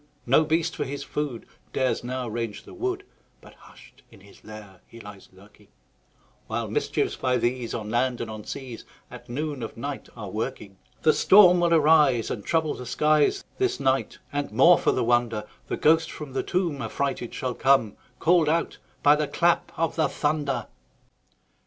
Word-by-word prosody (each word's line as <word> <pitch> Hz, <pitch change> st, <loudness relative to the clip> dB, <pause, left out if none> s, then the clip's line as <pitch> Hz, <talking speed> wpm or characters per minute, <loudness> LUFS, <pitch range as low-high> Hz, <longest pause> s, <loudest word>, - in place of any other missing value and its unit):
No 135 Hz, +6 st, +4 dB
beast, 165 Hz, +2 st, 0 dB
for -, -, -2 dB
his 140 Hz, +1 st, -5 dB
food, 145 Hz, -6 st, -4 dB, 0.3 s
Dares 130 Hz, -2 st, 0 dB
now 125 Hz, 0 st, -4 dB
range 115 Hz, -2 st, -4 dB
the -, -, -13 dB
wood, 380 Hz, +1 st, -3 dB, 0.4 s
But -, -, -16 dB
hush'd -, -, -18 dB
in 110 Hz, -4 st, -18 dB
his 100 Hz, +1 st, -18 dB
lair 105 Hz, -3 st, -12 dB
he 115 Hz, -, -14 dB
lies 100 Hz, -3 st, -12 dB
lurking; 100 Hz, +2 st, -20 dB, 0.8 s
While -, -, -3 dB
mischiefs, -, -, -1 dB
by 125 Hz, -1 st, 0 dB
these, 120 Hz, 0 st, -2 dB
On 110 Hz, -2 st, -5 dB
land 125 Hz, +1 st, 0 dB
and 120 Hz, -, -4 dB
on 110 Hz, -1 st, -8 dB
seas, 125 Hz, -2 st, -7 dB, 0.3 s
At -, -, -12 dB
noon 145 Hz, +1 st, -4 dB
of 115 Hz, -, -7 dB
night 140 Hz, +3 st, -6 dB
are 110 Hz, -, -6 dB
a -, -, -7 dB
working. 105 Hz, -3 st, -5 dB, 0.2 s
The 155 Hz, -, +5 dB
storm 185 Hz, -3 st, +6 dB
will 170 Hz, -1 st, +2 dB
arise, 150 Hz, -7 st, +4 dB
And 105 Hz, -, -4 dB
trouble 160 Hz, +2 st, 0 dB
the 125 Hz, -, -8 dB
skies 150 Hz, +3 st, +2 dB, 0.2 s
This 385 Hz, -1 st, 0 dB
night; 135 Hz, 0 st, 0 dB, 0.2 s
and, 145 Hz, 0 st, -2 dB
more 150 Hz, +11 st, +6 dB
for -, -, +2 dB
the -, -, 0 dB
wonder, 120 Hz, -2 st, +1 dB, 0.2 s
The -, -, -3 dB
ghost 160 Hz, +1 st, +3 dB
from 150 Hz, -4 st, -8 dB
the 135 Hz, -, 0 dB
tomb 170 Hz, -6 st, -1 dB
Affrighted 135 Hz, -4 st, -3 dB
shall 130 Hz, -1 st, -3 dB
come, 130 Hz, -5 st, +2 dB, 0.2 s
Call'd 165 Hz, -2 st, +3 dB
out 165 Hz, +2 st, -1 dB, 0.2 s
by 145 Hz, +1 st, +7 dB
the 150 Hz, 0 st, -1 dB
clap 170 Hz, +3 st, +1 dB
of 165 Hz, 0 st, -1 dB
the 160 Hz, -, +2 dB
thunder. 145 Hz, -4 st, -1 dB
130 Hz, 180 wpm, -25 LUFS, 115-155 Hz, 0.8 s, by